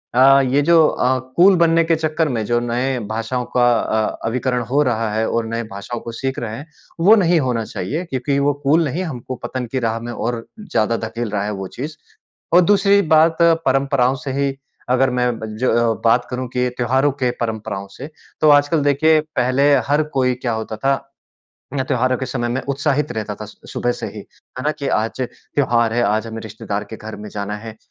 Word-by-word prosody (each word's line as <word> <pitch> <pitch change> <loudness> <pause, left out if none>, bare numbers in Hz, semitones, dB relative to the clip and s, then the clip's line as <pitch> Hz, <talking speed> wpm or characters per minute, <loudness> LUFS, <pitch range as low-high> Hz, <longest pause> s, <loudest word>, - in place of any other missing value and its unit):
अ, 135 +2 +7
ये 145 - +3
जो 160 0 +5
अ, 130 +1 +1 0.2
कूल 190 +2 +7
बनने 165 0 +4
के 165 0 +2
चक्कर 155 0 0
में 115 -4 -1
जो 120 +1 +1
नए 125 +2 -1
भाषाओं 115 +3 -2
का 120 0 +5
अ, 110 0 -1
अभिकरण 125 +1 -1
हो 145 +2 +3
रहा 115 -4 0
है 110 +1 0
और 115 -1 0
नए 115 +1 -3
भाषाओं 100 +4 -6
को 115 - -7
सीख 130 +3 -3
रहे 115 -2 -4
हैं, 145 - -8 0.3
वो 205 +7 +7
नहीं 175 -4 +3
होना 125 -5 0
चाहिए 150 - -4
क्योंकि 140 -1 -1
वो 145 +1 +2
कूल 155 +5 +4
नहीं, 175 +8 -2
हमको 130 -5 -5
पतन 130 -1 -3
की 130 - 0
राह 115 +1 -2
में 120 +1 -6
और 115 -1 -3
ज़्यादा 115 - 0
धकेल 115 0 -4
रहा 100 -1 -1
है 105 - -2
वो 95 - -4
चीज़। 150 +4 -5 0.6
और 175 - +8
दूसरी 200 +2 +4
बात 160 +1 +4 0.3
परंपराओं 135 -1 +2
से 135 - -2
ही 135 -1 0 0.3
अगर 130 +1 +3
मैं 125 -2 0
ब 110 - -5
ज - - -5
अ, 115 -1 +3
बात 120 +2 +3
करूँ 125 0 -3
कि 125 0 +1
त्योहारों 130 +4 +2
के 125 - +2
परंपराओं 105 -4 -3
से। 140 +8 -9 0.3
तो 155 - +5
आजकल 145 +2 +4
देखिए 155 +3 +4 0.2
पहले 135 +3 +3 0.2
हर 145 +2 +3
कोई 125 -1 +2
क्या 120 -2 -3
होता 110 0 -4
था, 135 +2 0 0.7
मैं 130 -2 0
त्योहारों 130 0 +1
के 130 - -3
समय 120 -2 -2
में 125 +3 -1
उत्साहित 145 +1 0
रहता 110 -1 -4
था - - -4
स - - -14 0.2
सुबह 120 - 0
से - - -6
ही, - - -8
है 130 - -12
ना? 150 - +2
कि, 140 -2 -4
"आज 110 +4 -1
त्योहार 120 -2 0
है, 120 - +2
आज 110 +1 +1
हमें 115 0 -6
रिश्तेदार 105 -1 -5
के 110 - -6
घर 110 +1 -8
में 105 0 -8
जाना 105 0 -4
है।" 110 +1 -9
125 Hz, 210 wpm, -19 LUFS, 115-145 Hz, 0.7 s, और